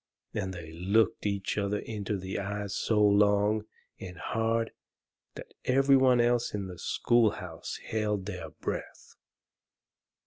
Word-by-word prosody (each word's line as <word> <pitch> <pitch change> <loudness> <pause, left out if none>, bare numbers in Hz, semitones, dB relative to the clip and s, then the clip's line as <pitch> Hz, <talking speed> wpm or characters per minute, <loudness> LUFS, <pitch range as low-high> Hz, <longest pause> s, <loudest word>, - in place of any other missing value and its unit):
And 95 - -2
they 85 -3 -8
looked 100 +6 +1
each 100 0 -1
other 100 0 0
in 105 -1 -5
the 95 -2 -3
eyes 100 0 -3
so 110 -2 +1
long 105 +1 +4 0.3
and 90 -2 -8
hard 115 +4 0 0.6
that - - -10
every 135 +2 +5
one 130 -2 +5
else 120 -2 +2
in 100 -1 -3
the 90 -2 -8
schoolhouse 105 -7 0
held 105 -3 0
their - - -6
breath. - - -6
105 Hz, 130 wpm, -29 LUFS, 95-115 Hz, 0.6 s, every